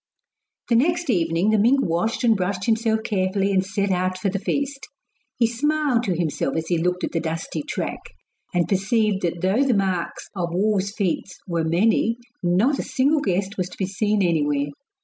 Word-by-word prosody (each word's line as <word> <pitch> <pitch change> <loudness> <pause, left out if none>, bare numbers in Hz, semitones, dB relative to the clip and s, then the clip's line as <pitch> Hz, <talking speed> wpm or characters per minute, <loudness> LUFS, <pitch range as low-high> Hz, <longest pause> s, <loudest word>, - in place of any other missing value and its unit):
The 235 - +4
next 340 +4 +2
evening 170 +1 +1
the 215 - +3
mink 245 +7 +4
washed 175 +9 -1
and 230 -2 +5
brushed 190 0 -2
himself 220 -1 +1
carefully 195 -1 0
and 190 -1 +2
set 200 0 -1
out 185 0 0
for 195 +2 -1
the 195 +1 -2
feast. 280 +6 -2 0.5
He 235 - +4
smiled 280 +2 +1
to 185 -5 0
himself 155 -5 -1
as 160 0 -2
he 175 -2 +2
looked 180 +2 -1
at - - -1
the 165 - 0
dusty 165 -1 -3
track, - - -4 0.5
and 175 -1 +1
perceived 200 +1 +1
that 170 -1 -2
though 190 +7 +2
the 260 -4 +2
marks 185 -4 -1
of 170 -2 -2
wolves' 200 0 +1
feet 195 -3 -1 0.2
were 170 -2 -1
many, 215 +7 +2 0.2
not 190 +11 +2
a - - +1
single 285 +2 +1
guest 195 0 -1
was 180 -1 -1
to - - -12
be 190 - 0
seen 205 +2 0
anywhere. 145 -4 +1
195 Hz, 190 wpm, -23 LUFS, 175-225 Hz, 0.5 s, and